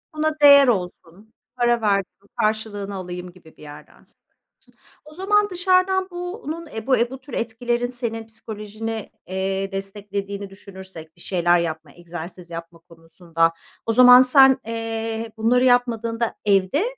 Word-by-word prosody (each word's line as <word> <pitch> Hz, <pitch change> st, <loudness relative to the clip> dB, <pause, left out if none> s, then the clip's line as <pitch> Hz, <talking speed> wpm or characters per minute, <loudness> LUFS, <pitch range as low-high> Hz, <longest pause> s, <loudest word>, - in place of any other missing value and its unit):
Buna 310 Hz, 0 st, 0 dB
değer 280 Hz, -2 st, +8 dB
olsun, 190 Hz, 0 st, -3 dB, 0.2 s
para 240 Hz, -1 st, +1 dB
verdim, 200 Hz, -1 st, -1 dB
karşılığını 210 Hz, -2 st, -2 dB
alayım 180 Hz, -1 st, -7 dB
gibi 175 Hz, -3 st, -19 dB
bir -, -, -18 dB
yerden 145 Hz, -1 st, -12 dB
söylüyorsun. -, -, -24 dB, 0.9 s
O 305 Hz, -, -14 dB
zaman 410 Hz, +4 st, +1 dB
dışarıdan 370 Hz, +1 st, +2 dB
bunun, 350 Hz, -2 st, -6 dB
eee, 220 Hz, -2 st, -8 dB
bu, 260 Hz, -, +4 dB
eee, 235 Hz, +1 st, +1 dB
bu 265 Hz, -, -8 dB
tür 285 Hz, -, -14 dB
etkilerin 240 Hz, +1 st, -2 dB
senin 230 Hz, -3 st, -5 dB
psikolojini, 220 Hz, 0 st, -7 dB, 0.2 s
eee, 190 Hz, +1 st, -2 dB
desteklediğini 200 Hz, 0 st, -5 dB
düşünürsek; 190 Hz, -5 st, -12 dB
bir 170 Hz, -, -19 dB
şeyler 175 Hz, -2 st, +2 dB
yapma, 160 Hz, -3 st, -4 dB
egzersiz 175 Hz, +1 st, -9 dB
yapma 165 Hz, 0 st, -8 dB
konusunda, 165 Hz, 0 st, -2 dB, 0.3 s
o 225 Hz, -, 0 dB
zaman 250 Hz, +1 st, +9 dB
sen, 265 Hz, 0 st, +6 dB
eee, 225 Hz, 0 st, -4 dB
bunları 245 Hz, +3 st, +2 dB
yapmadığında 235 Hz, -2 st, +1 dB
evde, 195 Hz, -, +2 dB
220 Hz, 140 wpm, -22 LUFS, 185-245 Hz, 0.9 s, zaman